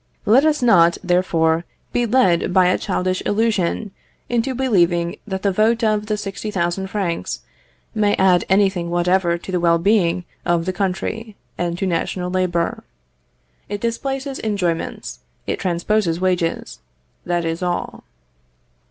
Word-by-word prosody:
Let 245 +8 +5
us 300 -4 +2
not, 170 -8 +5
therefore, 170 -3 +2 0.3
be 240 -1 +1
led 200 -8 +3
by 180 0 +4
a 185 - +1
childish 185 0 -1
illusion 210 -2 0 0.4
into 245 +2 0
believing 175 -9 +1
that 190 -1 -4
the 200 - +2
vote 225 +4 +2
of 215 -1 +1
the 215 -1 -1
60,000 195 -2 -3
francs 190 -4 -3 0.5
may 210 -2 +2
add 185 -2 +4
anything 190 -3 +2
whatever 175 0 +1
to 175 - -9
the 180 - 0
well 170 -1 +3
being 180 -2 +2 0.2
of 170 -1 +1
the 185 - -1
country, 200 +4 -3 0.2
and 175 -1 -2
to 195 - -2
national 180 0 -2
labour. 180 -2 -1 0.9
It 205 0 -3
displaces 270 +4 -3
enjoyments, 180 - -2 0.3
it - - -2
transposes 175 -1 0
wages 180 -3 -1 0.4
that 175 -1 -1
is 165 +1 -2
all. 175 -1 -3
185 Hz, 135 wpm, -20 LUFS, 175-215 Hz, 0.9 s, Let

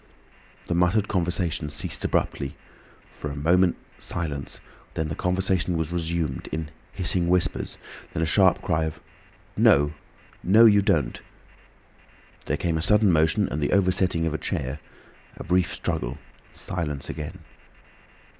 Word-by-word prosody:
The - - -2
muttered 90 +4 +2
conversation 85 -4 -1
ceased 75 0 -4
abruptly, 70 0 -1 0.6
for 75 - -6
a 70 - -6
moment 85 +5 +3 0.2
silence, 75 -5 -4 0.4
then 80 -1 -1
the 75 - -3
conversation 90 -1 0
was 80 0 -2
resumed, 85 -5 -2
in 80 -1 -4 0.2
hissing 90 -2 +1
whispers, 90 0 +1 0.3
then 80 - -1
a - - +2
sharp 95 +3 +3
cry 80 -2 +1
of 80 0 -5 0.6
"No! 75 +1 +4 0.5
no, 110 +5 +6
you 105 -2 +6
don't!" - - 0 1.3
There - - 0
came 80 -2 -1
a - - -2
sudden 105 +2 +4
motion 80 +5 +3
and 75 - -3
the 75 - 0
oversetting 95 -3 +2
of 80 - -1
a 80 - -2
chair, 65 +4 -3 0.6
a - - -7
brief 90 +1 +1
struggle. - - -3 0.3
Silence 75 -6 -4
again. 75 -2 -6
85 Hz, 135 wpm, -25 LUFS, 75-90 Hz, 1.3 s, no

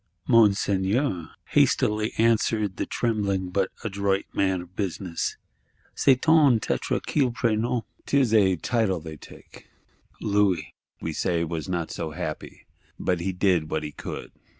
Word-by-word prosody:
_'—'Monseigneur,' 100 - +2 0.2
hastily 105 +1 +2
answered 110 -3 +2
the - - -2
trembling 100 -5 -1
but 95 0 +1
adroit 100 -2 0
man 95 -2 +1
of 90 +1 -19
business, 95 -3 -3 0.6
'c'est 130 -2 +3
une 150 -7 +6
titre - - -1
qu'ils 135 -4 +2
prennent 115 0 0 0.2
('tis 135 -5 +2
a 95 -4 +5
title 110 -1 0
they 80 -1 -8
take).' - - -15 0.5
Louis, 100 -3 +1 0.3
we 80 - -3
say, 85 +1 0
was 80 0 -4
not 85 -3 -2
so 80 - -4
happy; 80 -1 -6 0.3
but 90 -2 0
he 95 +3 -1
did 90 -4 +1
what 80 - -2
he 75 - -5
could. - - -7
100 Hz, 135 wpm, -25 LUFS, 90-110 Hz, 0.6 s, une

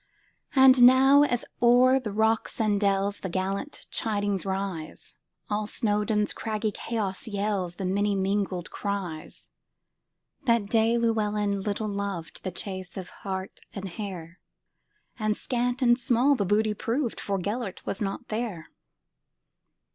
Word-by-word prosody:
And 265 -1 +7
now, 265 +3 +8
as 245 -5 +1 0.2
o'er 250 +2 +6
the 225 -5 -5
rocks 220 +2 +1
and 210 -2 +2
dellsThe 200 -1 0
gallant 195 - -3
chidings 205 -3 0
rise, 190 -4 -4 0.3
All 210 0 -1
Snowdon's 210 -1 0
craggy 215 -1 -2
chaos 210 -2 -3
yellsThe 200 -3 -2
many 200 +2 +1
mingled 190 -2 -1
cries! 190 -6 -5 0.9
That 230 -5 +2
day 225 +1 +3
Llewelyn 210 -3 0
little 210 +2 -2
lovedThe 195 -3 -4
chase 185 -2 -6
of 185 -1 -6
hart 190 -1 -5 0.2
and 195 -1 -5
hare; 180 -3 -7 0.8
And 215 -1 0
scant 245 +1 -1
and 240 0 +5
small 250 +3 +3
the 215 -7 0
booty 210 +2 +2
proved, 235 +4 -2
For 200 -1 -1
Gêlert 205 +2 -4
was 200 - -3
not 200 +4 -3
there. 215 -7 -4
205 Hz, 125 wpm, -27 LUFS, 195-230 Hz, 0.9 s, now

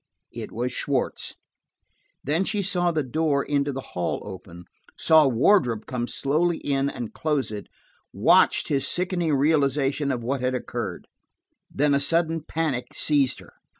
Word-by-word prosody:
It - - -7
was 125 +3 -2
Schwartz. 140 -3 -2 0.9
Then 155 +6 +1
she 205 0 -1
saw 180 -2 +1
the 155 -3 0
door 145 +1 0
into 140 -1 0
the 135 0 -7
hall 90 -1 -2
open, 90 -3 -10 0.3
saw 160 -2 +5
Wardrop 125 - +2
come 120 -1 -3
slowly 160 +7 0
in 140 0 0
and 120 -5 -6
close 150 -6 -1
it, 105 -1 -7 0.4
watched - - +4
his 140 -2 0
sickening 175 -4 0
realization 140 -1 +1
of 120 -3 -3
what 130 +2 -2
had 130 0 0
occurred; 120 -7 -5 0.6
then 145 0 +1
a 140 - +3
sudden 165 +2 +1
panic 155 -6 -3
seized 140 -4 +2
her. - - -17
140 Hz, 150 wpm, -24 LUFS, 125-160 Hz, 0.9 s, saw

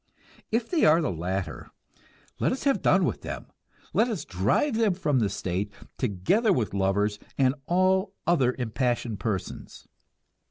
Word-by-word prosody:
If 230 +1 0
they 335 -4 +1
are 155 +2 +6
the 155 - 0
latter, 90 +3 -4 0.7
let - - +2
us 260 - -3
have 275 -1 +2
done - - +4
with - - -2
them, - - -6 0.5
let 230 - +3
us 210 - -3
drive 105 - +1
them 220 -4 +2
from 150 -8 +1
the 105 -4 +1
state, 100 0 -3 0.3
together 130 - +2
with 120 - 0
lovers 100 +2 +1 0.2
and 130 -1 +3
all 190 +2 +2
other 135 -8 +3
impassioned 120 -2 -1
persons. 105 -5 -5
130 Hz, 150 wpm, -27 LUFS, -, 0.7 s, are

